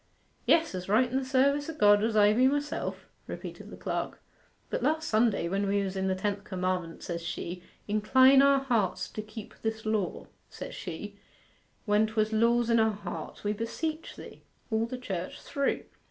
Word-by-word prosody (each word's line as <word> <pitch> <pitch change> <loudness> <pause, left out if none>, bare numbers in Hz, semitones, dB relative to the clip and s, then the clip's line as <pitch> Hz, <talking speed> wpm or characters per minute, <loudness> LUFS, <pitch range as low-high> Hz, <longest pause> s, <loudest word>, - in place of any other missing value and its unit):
'Yes, 325 -5 +4
as 185 0 -5
right 230 +5 +4
in - - -2
the 265 - +1
service 280 +3 +2
o' 325 - -5
God 205 -6 +5
as 220 -1 +1
I 210 0 +6
be 255 +4 +4
myself,' 290 +2 -2 0.2
repeated - - -7
the - - -10
clerk. - - -3 0.5
'But - - -1
last 315 +1 +1
Sunday, 215 -5 +2
when 195 +3 0
we 200 0 +1
were 190 0 -4
in 190 0 -1
the 190 - +1
tenth 200 +1 -2
commandment, 185 -3 -3
says 170 -1 -4
she, 175 +1 -5 0.3
"Incline 260 +6 +6
our 275 0 +5
hearts 225 -9 0
to 215 - -5
keep 215 0 -10
this 220 0 -3
law," 215 -4 -1 0.2
says - - -8
she, 200 +3 -7 0.7
when 210 0 +3
'twas 215 0 0
"Laws 235 +1 +3
in 230 - +5
our 220 0 +4
hearts, 205 - -7
we 205 0 0
beseech 310 +9 -4
Thee," - - -11 0.3
all 220 +1 +1
the 255 - -5
church 190 -8 -5
through. 280 -1 -1
215 Hz, 185 wpm, -29 LUFS, 200-260 Hz, 0.7 s, I